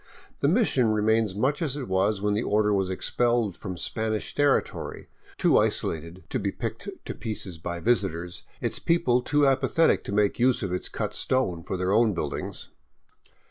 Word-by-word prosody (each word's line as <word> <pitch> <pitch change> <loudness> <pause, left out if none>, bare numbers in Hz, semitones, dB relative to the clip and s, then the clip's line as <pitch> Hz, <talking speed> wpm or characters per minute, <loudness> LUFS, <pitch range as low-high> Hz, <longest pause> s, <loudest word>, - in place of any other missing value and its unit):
The - - +2
mission 160 - +3
remains 110 -1 +2
much 135 - 0
as 145 -4 -1
it 135 - -5
was 95 +2 +1
when 105 0 +2
the 105 - +1
order 105 -1 +2
was 95 -2 +1
expelled 120 +1 0
from 95 -3 -6
Spanish 110 +3 -2
territory, 145 -1 0 0.3
too - - +4
isolated 85 +3 -2
to 130 - -1
be 100 -2 -1
picked 115 - -5 0.2
to - - -4
pieces 100 -7 -5
by 85 +1 -4
visitors, 90 -5 0 0.2
its - - -1
people 150 -8 +2
too 145 +3 +2
apathetic 140 +4 +3
to - - -4
make 105 +1 +1
use 125 -1 +3
of 95 -2 -2
its 90 - -2
cut - - -3
stone 115 -11 0
for 95 - -4
their 90 +1 0
own 110 -2 +3
buildings. 75 -4 -4
110 Hz, 175 wpm, -26 LUFS, 95-125 Hz, 0.3 s, too